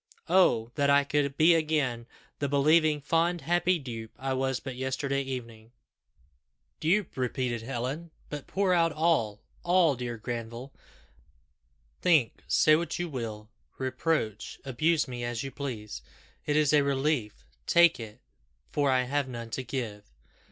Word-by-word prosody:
Oh! 120 -11 +4
that 140 -1 +1
I 140 0 +5
could 140 -1 -1
be 165 +2 +6
again 150 -7 0 0.3
the 140 - -1
believing, 150 +2 +3
fond, 165 +3 +1
happy 175 +4 +2
dupe 115 -6 -7
I 135 0 -2
was 130 -1 -1
but 135 -2 -7
yesterday 135 +2 -1
evening!" 120 -4 -7 1.1
"Dupe!" 180 +3 +1
repeated 125 -2 -2
Helen. 135 +7 -4 0.2
"But 145 -2 -7
pour 190 0 +1
out 165 -1 +3
all 145 -10 +1 0.2
all, 175 -3 +4
dear 120 -1 -5
Granville. 120 +3 -6 1.3
Think 155 -10 +2
say 155 - +5
what 165 0 -2
you 175 -1 -3
will 110 -5 -6 0.3
reproach 130 -4 -2
abuse 150 +5 +1
me 120 -1 -5
as 120 0 -3
you 135 - -5
please. 115 - -6 0.5
It 145 - +1
is 150 -1 +3
a 150 - +6
relief 135 - -1 0.2
take 170 -3 +5
it 110 -2 -9 0.5
for 145 -2 +1
I 130 -1 +3
have 140 +2 -1
none 115 -2 -7
to 130 - -2
give." 115 -6 -4
135 Hz, 145 wpm, -28 LUFS, 120-155 Hz, 1.3 s, be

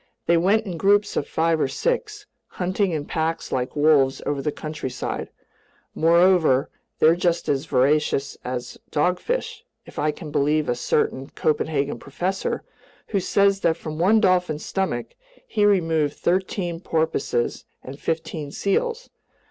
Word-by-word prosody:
They 170 - +4
went 200 +6 +3
in 180 -4 -5
groups 205 +4 +3
of - - -1
five 165 -1 +1
or - - +2
six, 425 - -2 0.2
hunting 185 +2 -1
in 155 -4 -2
packs 160 +1 -2
like 125 +1 -2
wolves 145 -3 +4
over 145 -1 -1
the 150 - -1
countryside; 150 -5 -5 0.6
moreover, 170 -4 +4 0.3
they're 160 +2 +5
just 175 -1 0
as 140 +2 0
voracious 140 +1 +1
as 125 -1 -5
dogfish, 180 - -1 0.2
if - - -9
I 155 - +1
can 150 0 -6
believe 150 +2 +1
a - - +2
certain 130 +2 -1
Copenhagen 150 -2 -1
professor 180 +7 -3 0.5
who 200 - +1
says 200 +1 +2
that 170 -3 +1
from 155 -2 -6
one 205 +6 +5
dolphin's 180 -6 +1
stomach, 185 -12 -2 0.3
he 210 - +1
removed 165 -7 +2
thirteen 180 -1 -1
porpoises 160 -8 -1 0.2
and 135 +2 -9
fifteen 160 -2 -3
seals. 460 - -1
160 Hz, 140 wpm, -23 LUFS, 145-185 Hz, 0.6 s, they're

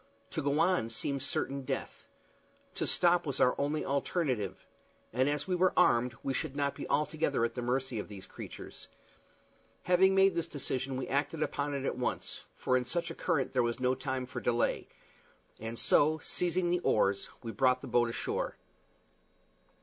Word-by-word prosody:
To 160 - -2
go 145 +1 +1
on 170 -8 +2
seemed 135 +4 -2
certain 140 +1 -1
death. 130 - -5 0.7
To - - -2
stop 175 -2 +3
was 140 - -2
our 125 - +5
only 145 +2 -1
alternative; 135 - -1 0.5
and 130 +4 +2
as 145 +2 -1
we 185 - 0
were 180 0 +3
armed 120 0 +4
we 135 - -1
should 135 - -3
not 140 -1 0
be - - -7
altogether 150 -4 +1
at 115 - -3
the 125 - -4
mercy 125 -1 -1
of - - -5
these 100 -2 -10
creatures. - - -9 1.0
Having 190 +2 +4
made 195 0 +5
this 170 -1 -1
decision 135 -3 -3
we 130 - -3
acted 145 +3 0
upon 145 0 -2
it 140 -1 -3
at 125 - -2
once, 125 - -3
for 130 - +1
in 125 -1 +1
such 170 +7 -2
a - - -4
current 135 -4 -1
there 130 - +3
was 120 0 -1
no 125 0 +2
time 130 0 -3
for 125 -1 -6
delay; 120 0 +1 0.7
and 115 +1 -5
so, 155 +6 +4
seizing 175 0 0
the 180 - +2
oars, 100 - +1
we 115 - -4
soon 105 - -15
brought 130 0 +3
the - - -7
boat 120 -1 +3
ashore. 115 - -2
135 Hz, 180 wpm, -31 LUFS, 125-155 Hz, 1.0 s, our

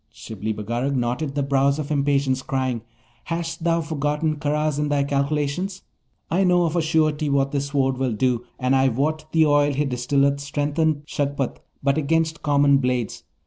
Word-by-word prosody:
Shibli 110 0 -5
Bagarag 120 +6 -2
knotted 130 +4 -1
the 145 - 0
brows 140 +1 +2
of 150 -1 -4
impatience, 140 -2 +1
crying, 130 -3 -2 0.4
'Hast 165 -1 -4
thou 170 0 +2
forgotten 150 0 -1
Karaz 150 0 0
in 150 0 0
thy 145 -1 +2
calculations? 145 +7 -1 0.5
I 185 +4 +3
know 180 -1 +4
of 165 0 -1
a 170 - +2
surety 155 -1 +1
what 140 -1 +1
this 140 -1 -1
Sword 135 -2 0
will 130 -3 0
do, 120 +2 0
and 130 +1 +1
I 135 0 +4
wot 155 +5 -2
the 160 -1 +4
oil 145 -1 +3
he 145 +2 0
distilleth 140 +2 +1
strengtheneth 145 +1 -1
Shagpat 140 -3 -2 0.2
but 140 +2 +2
against 160 +2 0
common 140 -1 +4
blades. 125 -3 -2
140 Hz, 170 wpm, -23 LUFS, 135-155 Hz, 0.5 s, know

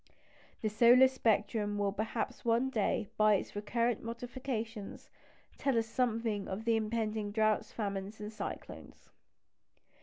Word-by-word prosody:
The 215 - +2
solar 240 +4 +7
spectrum 215 -4 0
will 200 -1 +1
perhaps 220 +2 -3
one 235 +3 +2
day, 215 -1 0
by 215 -1 +5
its 195 - -4
recurrent 230 +2 0
modifications, 230 -2 -5 0.5
tell 275 -4 +1
us 225 - +2
something 225 -3 -1
of 215 +4 -5
impending 220 -2 0
droughts, 215 0 +1
famines, 200 -1 -4
and 210 +1 -6
cyclones. - - -8
220 Hz, 120 wpm, -33 LUFS, 210-235 Hz, 0.5 s, solar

